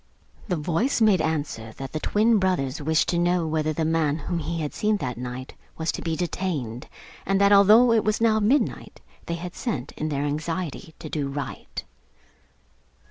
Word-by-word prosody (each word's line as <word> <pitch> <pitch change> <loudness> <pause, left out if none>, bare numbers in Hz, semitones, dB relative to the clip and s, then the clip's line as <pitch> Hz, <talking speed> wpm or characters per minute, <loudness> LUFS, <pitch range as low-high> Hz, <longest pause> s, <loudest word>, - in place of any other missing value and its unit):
The 180 - 0
voice 170 - 0
made 210 -6 +4
answer 145 -9 -2
that 135 +3 -7
the 155 - -3
twin 215 +5 +3
brothers 155 -7 0
wished 160 +2 +2
to 170 - +1
know 175 0 +2
whether 155 0 0
the 160 +1 -1
man 155 -2 +1
whom 170 +3 -3
he 165 +1 -3
had 150 - -3
seen 215 0 +1
that 125 -9 -3
night 125 +1 -6 0.2
was 160 0 0
to - - -6
be 165 -1 -2
detained; 160 -9 -3 0.4
and 195 +1 +1
that 200 0 +5
although 215 +5 +7
it 225 -2 +3
was 215 0 +1
now 225 -1 +3
midnight 240 +8 0 0.3
they 170 - -1
had 175 +1 -6
sent, 145 - -3
in 155 - -4
their 140 -1 -1
anxiety 160 +2 -4
to 165 - -8
do 150 -2 -2
right. 140 0 -6
165 Hz, 185 wpm, -25 LUFS, 145-195 Hz, 0.4 s, although